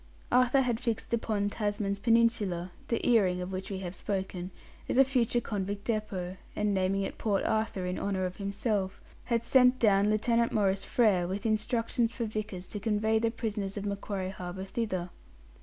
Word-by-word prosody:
Arthur 255 +2 +5
had 240 -3 0
fixed 230 -1 -2
upon 215 -3 0
Tasman's 205 -2 -1
Peninsula 210 -6 +2 0.2
the 230 - -1
earring 195 -7 +4
of 180 +1 -4
which 190 0 -4
we 195 - -3
have 175 - -5
spoken 190 -3 -3 0.4
as - - 0
a 270 - +9
future 250 -3 +1
convict 200 -2 -3
depôt, 195 -5 -2 0.2
and 210 -1 +1
naming 195 +1 +1
it - - -5
Port 205 -3 +1
Arthur, 220 -4 0
in 180 0 -2
honour 190 -2 -1
of 180 0 -5
himself, 200 -1 -1 0.3
had 235 -1 0
sent 250 +1 +5
down 205 -3 +4
Lieutenant 230 +2 +2
Maurice 195 -2 +1
Frere 200 -7 +3
with 195 +3 -4
instructions 230 +2 0
for 235 - -1
Vickers 210 -4 -4
to 205 - -5
convey 220 +1 +1
the 230 0 +2
prisoners 210 -4 -3
of 205 - -3
Macquarie 200 -1 -3
Harbour 190 0 -6
thither. 190 -5 -3
205 Hz, 175 wpm, -30 LUFS, 190-230 Hz, 0.4 s, a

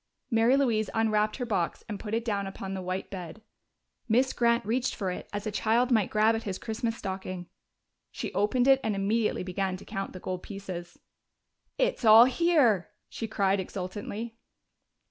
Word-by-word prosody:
Mary 230 +4 +4
Louise 225 -6 +1
unwrapped 215 -1 +2
her 250 - -3
box 195 -7 -1
and 205 -3 -5
put 215 0 -3
it 230 0 -2
down 200 -3 -1
upon 195 0 -6
the 190 - -4
white 185 +1 -4
bed. 180 0 -7 0.7
Miss 255 +4 +3
Grant 235 -1 +2
reached 245 +4 0
for 190 -4 -2
it - - -7
as 205 +1 -4
a 215 - -2
child 230 +4 +2
might 220 -5 +3
grab 215 +1 +3
at 225 - -2
his 195 -4 -4
Christmas 225 +1 -3
stocking. 190 -2 -5 0.6
She - - -6
opened 245 +5 +2
it 270 -1 +6
and 220 -2 0
immediately 210 +1 0
began 185 0 -2
to - - -13
count 195 0 -5
the 185 - -8
gold 185 0 -4
pieces. 185 -4 -7 0.8
"It's - - 0
all 225 +1 +9
here!" 260 - +3 0.2
she 225 - -5
cried 200 -2 +1
exultantly. 205 +5 -5
215 Hz, 175 wpm, -28 LUFS, 195-230 Hz, 0.8 s, all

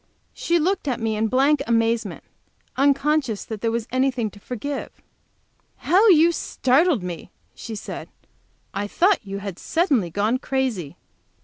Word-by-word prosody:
She 345 - 0
looked 350 0 0
at 255 -4 -1
me 225 -1 -1
in 220 +1 +1
blank 275 +4 +3
amazement, 230 0 0 0.5
unconscious 280 -3 +1
that 220 -3 -6
there 230 - +1
was 230 0 -2
anything 255 -4 0
to 205 - -15
forgive. 255 +6 -5 0.9
"How 385 +7 +3
you 335 -1 +6
startled 280 - +1
me!" 175 -3 -6 0.2
she 225 - -7
said. - - -7 0.6
"I 200 +1 -2
thought 370 - +2
you 195 -1 -6
had 190 -3 -6
suddenly 285 - +1
gone 210 +8 0
crazy." 250 - -2
250 Hz, 140 wpm, -23 LUFS, 215-295 Hz, 0.9 s, you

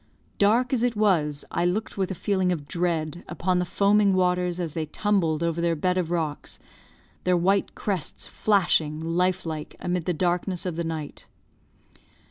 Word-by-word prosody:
Dark 235 +6 +3
as 245 - +2
it 245 -1 +1
was, 165 -9 +1
I 170 - 0
looked 185 +5 -1
with 190 -2 -1
a 190 - -3
feeling 190 0 0
of 150 -5 -3
dread 170 -1 -2
upon 180 +1 0
the 180 - 0
foaming 200 +2 +3
waters 180 -1 +1
as 165 -4 -3
they 160 -2 -3
tumbled 170 -3 0
over 170 0 0
their 170 -1 +1
bed 180 +4 0
of 170 -3 -2
rocks, 160 -4 -3 0.7
their 180 -1 +3
white 195 +3 +1
crests 190 -7 -3
flashing, 175 -7 +1
life 180 +3 0
like, 155 -2 -5
amid 180 -2 -2
the 180 - +1
darkness 180 +2 -1
of 180 -3 -2
the 170 - -2
night. 160 -3 -6
180 Hz, 170 wpm, -25 LUFS, 165-190 Hz, 0.7 s, Dark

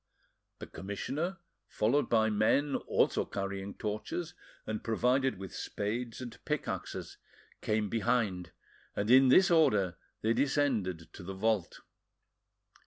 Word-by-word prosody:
The - - -7
commissioner, 145 - -4 0.3
followed 125 +7 +1
by 110 -1 +3
men 120 +7 +2
also - - +1
carrying 100 0 -4
torches, 110 +11 -4 0.3
and 110 0 -4
provided 125 +1 +1
with 95 -1 -8
spades 115 +3 -3
and 120 -3 -9
pickaxes, 150 -2 -4 0.4
came 105 -1 0
behind, 105 -4 0 0.5
and 105 +3 0
in 130 +1 +8
this 185 +9 +6
order 105 - +3 0.3
they 110 +1 +3
descended 110 - 0
to - - -10
the 95 +2 -6
vault. 105 -2 0
110 Hz, 115 wpm, -31 LUFS, 100-130 Hz, 0.5 s, in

